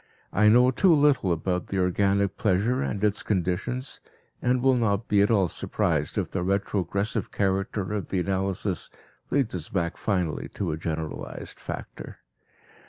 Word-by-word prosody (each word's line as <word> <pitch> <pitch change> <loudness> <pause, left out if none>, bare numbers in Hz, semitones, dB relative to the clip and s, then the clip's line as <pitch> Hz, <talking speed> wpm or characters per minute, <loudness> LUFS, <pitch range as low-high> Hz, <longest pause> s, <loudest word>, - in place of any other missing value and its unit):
I 105 +1 +5
know 125 +3 +6
too 185 +8 +4
little 145 - +4
about 90 +2 -2
organic 95 +1 +2
pleasure 110 +6 +1
and 105 -6 -2
its 105 -1 +2
conditions, 100 +7 -2 0.4
and 125 0 +1
will 135 0 +5
not 115 -3 +1
be 100 -1 +4
at 100 - +3
all 100 -5 +3
surprised - - -1
if - - -1
the 95 - -2
retrogressive 100 +2 -1
character 100 0 -1
of 105 -2 -3
the 95 - 0
analysis 95 -1 -2 0.4
leads 135 -5 +1
us 85 -4 -5
back 85 -3 -1
finally 90 -7 -1
to 95 -5 -1
a 75 - -3
generalized 80 -1 -5
factor. - - -7
100 Hz, 150 wpm, -26 LUFS, 90-110 Hz, 0.4 s, know